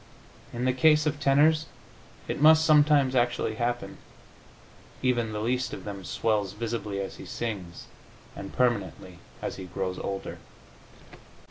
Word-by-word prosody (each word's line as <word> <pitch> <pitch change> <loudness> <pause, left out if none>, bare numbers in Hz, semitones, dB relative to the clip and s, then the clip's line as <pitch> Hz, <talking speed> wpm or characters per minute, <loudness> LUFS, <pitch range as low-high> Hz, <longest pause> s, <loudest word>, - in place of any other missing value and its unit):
In 120 +1 -3
the 130 - +2
case 150 +3 +4
of 150 -1 -1
tenors 150 +3 +3 0.6
it - - -3
must 160 +1 +7
sometimes 150 -3 +4
actually 120 -2 +1
happen; 120 0 -2 1.0
even 120 -3 +1
the 105 0 -4
least 125 +1 -1
of 95 - -7
them 100 -2 -7
swells 105 0 -1
visibly 105 -2 -4
as 95 - -5
he - - -10
sings, 95 -7 -5 0.5
and 100 - -8
permanently 100 -7 -1 0.2
as - - -4
he 95 - -7
grows 90 +1 -4
older.... 100 0 -5
120 Hz, 135 wpm, -27 LUFS, 100-140 Hz, 1.0 s, must